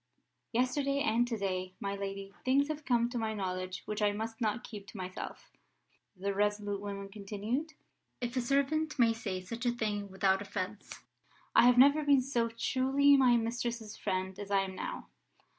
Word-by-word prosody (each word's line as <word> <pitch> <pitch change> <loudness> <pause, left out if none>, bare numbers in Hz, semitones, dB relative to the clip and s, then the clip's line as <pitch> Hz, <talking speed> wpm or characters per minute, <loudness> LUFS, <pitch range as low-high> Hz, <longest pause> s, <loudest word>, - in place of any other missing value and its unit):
"Yesterday 275 +4 +1
and 240 -3 +2
to 235 -2 -2
day, 185 -2 -2
my 200 0 -2
lady, 195 0 -5
things 280 +3 +3
have 305 -1 -4
come 240 -3 +3
to 245 - -2
my 220 -1 -1
knowledge 185 -2 -3
which 210 0 -3
I 205 -1 +3
must 225 +2 -5
not 225 +2 0
keep 205 -4 -9
to 210 - -10
myself," 185 -1 -7 0.7
the 200 +2 -1
resolute 205 0 0
woman 200 -1 -5
continued. 215 +9 -4 0.5
"If 245 0 -3
a 255 - +2
servant 280 +5 +1
may 230 -3 +5
say 195 -5 -4
such 230 +6 -4
a - - +4
thing 210 -4 -2
without 190 0 +2
offence, 200 0 -5 0.5
I 245 - +8
have 250 0 +5
never 285 +4 +7
been 285 -2 +5
so 240 -3 0
truly 265 +4 +3
my 255 -3 +5
mistress's 230 -1 -3
friend 190 +1 -2
as 205 -1 -6
I 200 -1 +3
am 190 -1 -4
now. - - -6
220 Hz, 175 wpm, -32 LUFS, 200-250 Hz, 0.7 s, I